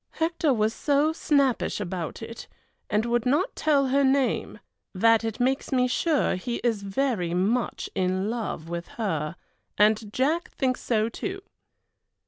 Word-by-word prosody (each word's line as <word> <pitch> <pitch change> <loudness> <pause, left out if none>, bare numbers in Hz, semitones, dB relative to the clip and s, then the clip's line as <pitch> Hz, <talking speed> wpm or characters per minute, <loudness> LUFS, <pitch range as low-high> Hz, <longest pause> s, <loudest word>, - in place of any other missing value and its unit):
Hector 325 -2 +1
was 220 -2 +1
so 295 +4 +2
snappish 280 -9 +1
about 180 0 -4
it, 230 +1 -8 0.4
and 210 +2 +1
would 240 -1 +1
not 290 - +1
tell 280 -4 +2
her 280 +2 +3
name, 270 -1 +1 0.4
that 225 +4 +4
it 225 0 -3
makes 265 +4 0
me 250 -1 +3
sure 305 +4 +1
he 235 +7 -3
is 230 -4 +1
very 195 -4 -1
much 220 +7 0
in 185 0 0
love 220 -8 -3
with 170 0 -5
her, 160 -8 -2 0.4
and 215 0 +3
Jack 300 +9 0
thinks 255 -1 -1
so 220 -2 +1
too. 385 - -5
235 Hz, 145 wpm, -26 LUFS, 205-275 Hz, 0.4 s, that